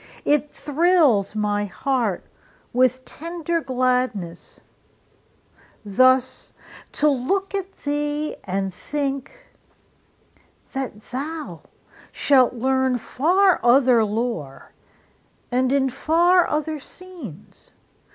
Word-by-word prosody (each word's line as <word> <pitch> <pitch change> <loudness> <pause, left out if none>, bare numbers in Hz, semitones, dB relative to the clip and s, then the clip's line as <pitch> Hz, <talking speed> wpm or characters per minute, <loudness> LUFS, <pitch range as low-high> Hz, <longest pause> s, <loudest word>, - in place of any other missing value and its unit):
it 295 0 +2
thrills 295 - +2
my 205 -1 0
heart 230 -2 -2 0.5
With 255 +1 +2
tender 335 +1 -3
gladness, 250 - -2 1.3
thus 255 +5 +2 0.4
to 300 - +2
look 340 +9 0
at 390 -1 -3
thee, 295 +1 -2
And 195 0 -2
think 285 - -5 1.2
that 255 -6 -6
thou 280 - -5 0.5
shalt 260 -4 +3
learn 260 +1 +1
far 360 - +2
other 245 -1 +5
lore, 210 - -4 0.8
And 255 +1 +1
in 275 -1 +2
far 345 +7 +3
other 305 0 -2
scenes! 295 - -12
265 Hz, 85 wpm, -22 LUFS, 240-305 Hz, 1.3 s, other